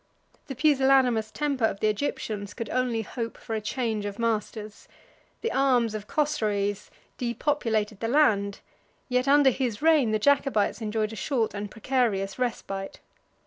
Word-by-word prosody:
The 270 Hz, -, -5 dB
pusillanimous 265 Hz, -5 st, +3 dB
temper 280 Hz, -1 st, -2 dB
of 195 Hz, -, -1 dB
the 215 Hz, -, +2 dB
Egyptians 215 Hz, -2 st, -3 dB
could 230 Hz, -2 st, -5 dB
only 245 Hz, -3 st, 0 dB
hope 230 Hz, +2 st, -5 dB
for 225 Hz, -, -7 dB
a 220 Hz, -, -1 dB
change 220 Hz, -1 st, -2 dB
of 200 Hz, 0 st, -6 dB
masters; 215 Hz, -2 st, -3 dB, 0.5 s
the 460 Hz, -, -1 dB
arms 250 Hz, -5 st, +2 dB
of 210 Hz, -1 st, -6 dB
Chosroes 210 Hz, -9 st, -1 dB, 0.3 s
depopulated 230 Hz, -4 st, -1 dB
the 225 Hz, -, -2 dB
land, 210 Hz, -7 st, +2 dB, 0.5 s
yet 250 Hz, +1 st, +1 dB
under 280 Hz, -1 st, +6 dB
his 240 Hz, -4 st, -2 dB
reign 310 Hz, -7 st, +5 dB
the 215 Hz, -, +2 dB
Jacobites 265 Hz, -3 st, +2 dB
enjoyed 215 Hz, 0 st, -1 dB
a -, -, -6 dB
short 230 Hz, 0 st, -1 dB
and 205 Hz, 0 st, -5 dB
precarious 220 Hz, -3 st, -1 dB
respite. 195 Hz, -5 st, -3 dB
230 Hz, 145 wpm, -26 LUFS, 210-265 Hz, 0.5 s, under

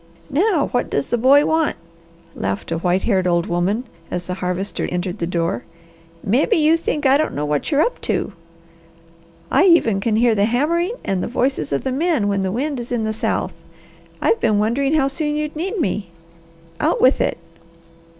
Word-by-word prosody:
"Now 335 Hz, +1 st, +2 dB
what 245 Hz, -, 0 dB
does 140 Hz, 0 st, -1 dB
the 240 Hz, -, +1 dB
boy 280 Hz, +5 st, +5 dB
want?" 320 Hz, -1 st, +1 dB, 0.6 s
laughed 95 Hz, +8 st, -4 dB
a 165 Hz, -, -1 dB
white 180 Hz, +2 st, +1 dB
haired 190 Hz, -5 st, +1 dB
old 170 Hz, -1 st, +2 dB
woman, 180 Hz, +7 st, 0 dB, 0.3 s
as 180 Hz, 0 st, -4 dB
the 180 Hz, -, -3 dB
Harvester 180 Hz, +1 st, -3 dB
entered 180 Hz, +2 st, -3 dB
the 170 Hz, -, -1 dB
door. 170 Hz, -8 st, -1 dB, 0.6 s
"Mebby 245 Hz, -, +2 dB
you 315 Hz, +1 st, +4 dB
think 305 Hz, -3 st, -2 dB
I 270 Hz, +1 st, +6 dB
don't 310 Hz, -, -1 dB
know 145 Hz, -, -1 dB
what 150 Hz, -1 st, -1 dB
you're 290 Hz, -1 st, +3 dB
up 485 Hz, -, -2 dB
to! -, -, -2 dB, 1.2 s
I -, -, +4 dB
even 235 Hz, -, +4 dB
can 220 Hz, +1 st, 0 dB
hear 235 Hz, +1 st, +4 dB
the 200 Hz, -1 st, +2 dB
hammering 335 Hz, -, 0 dB
and 190 Hz, -2 st, -1 dB
the -, -, -2 dB
voices 245 Hz, -, -1 dB
of 140 Hz, -, -1 dB
the 265 Hz, -, -1 dB
men 295 Hz, -5 st, +1 dB
when 200 Hz, -1 st, 0 dB
the 190 Hz, -1 st, -1 dB
wind 275 Hz, +5 st, -2 dB
is 240 Hz, +1 st, -7 dB
in 240 Hz, -2 st, 0 dB
the 220 Hz, 0 st, -1 dB
south. 220 Hz, -, -2 dB, 0.7 s
I've 460 Hz, -, +2 dB
been 215 Hz, -2 st, +2 dB
wondering 265 Hz, +8 st, +1 dB
how 275 Hz, -3 st, +3 dB
soon 295 Hz, +2 st, -2 dB
you'd 300 Hz, 0 st, -3 dB
need 380 Hz, +6 st, -3 dB
me. 195 Hz, -, -1 dB, 0.7 s
Out -, -, +1 dB
with 260 Hz, +2 st, +4 dB
it!" -, -, 0 dB
235 Hz, 190 wpm, -20 LUFS, 185-295 Hz, 1.2 s, I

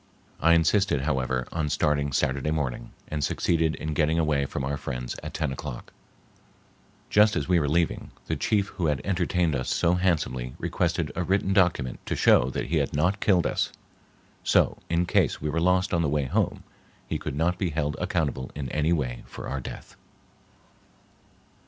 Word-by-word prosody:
I 85 Hz, +3 st, +5 dB
insisted, 85 Hz, -1 st, +2 dB
however, 65 Hz, -3 st, -1 dB
on 75 Hz, -3 st, -1 dB
starting 70 Hz, -1 st, +1 dB
Saturday 70 Hz, +2 st, 0 dB
morning, 75 Hz, -6 st, -2 dB, 0.2 s
and 75 Hz, -1 st, -3 dB
succeeded 80 Hz, +3 st, +1 dB
in 80 Hz, 0 st, -4 dB
getting 80 Hz, +2 st, +2 dB
away 75 Hz, -4 st, +1 dB
from 70 Hz, -, -4 dB
our 70 Hz, +1 st, -1 dB
friends 65 Hz, -4 st, -5 dB
at -, -, -7 dB
ten 80 Hz, -4 st, -1 dB
o'clock. 65 Hz, -2 st, -7 dB, 1.2 s
Just 105 Hz, +1 st, +5 dB
as -, -, -1 dB
we 90 Hz, -1 st, +4 dB
were 75 Hz, -3 st, 0 dB
leaving, 85 Hz, +2 st, 0 dB, 0.2 s
the -, -, -1 dB
chief 100 Hz, -2 st, +1 dB
who 85 Hz, -, -2 dB
had 75 Hz, -2 st, +1 dB
entertained 90 Hz, -4 st, +1 dB
us 65 Hz, -, -2 dB
so 85 Hz, -, +2 dB
handsomely 75 Hz, -9 st, 0 dB
requested -, -, -1 dB
a 90 Hz, -, -1 dB
written 95 Hz, +2 st, +1 dB
document 90 Hz, -, +2 dB
to -, -, -1 dB
show 60 Hz, -, +4 dB
that -, -, -3 dB
he -, -, 0 dB
had -, -, -1 dB
not 90 Hz, +7 st, +1 dB
killed 90 Hz, -4 st, +3 dB
us, -, -, 0 dB, 0.7 s
so -, -, +3 dB
in 85 Hz, +1 st, +2 dB
case -, -, +2 dB
we 75 Hz, 0 st, -2 dB
were 80 Hz, +2 st, 0 dB
lost 90 Hz, +3 st, +2 dB
on 85 Hz, -, +2 dB
the 80 Hz, -, +1 dB
way 75 Hz, -1 st, 0 dB
home 65 Hz, -, -1 dB, 0.4 s
he -, -, -2 dB
could -, -, -5 dB
not 85 Hz, +4 st, 0 dB
be 95 Hz, -, 0 dB
held 75 Hz, -1 st, -1 dB
accountable 70 Hz, -6 st, -1 dB
in 70 Hz, -3 st, -4 dB
any 75 Hz, +5 st, 0 dB
way 65 Hz, -8 st, -1 dB
for -, -, -8 dB
our 70 Hz, -, -3 dB
death. -, -, -9 dB
75 Hz, 180 wpm, -26 LUFS, 70-85 Hz, 1.2 s, I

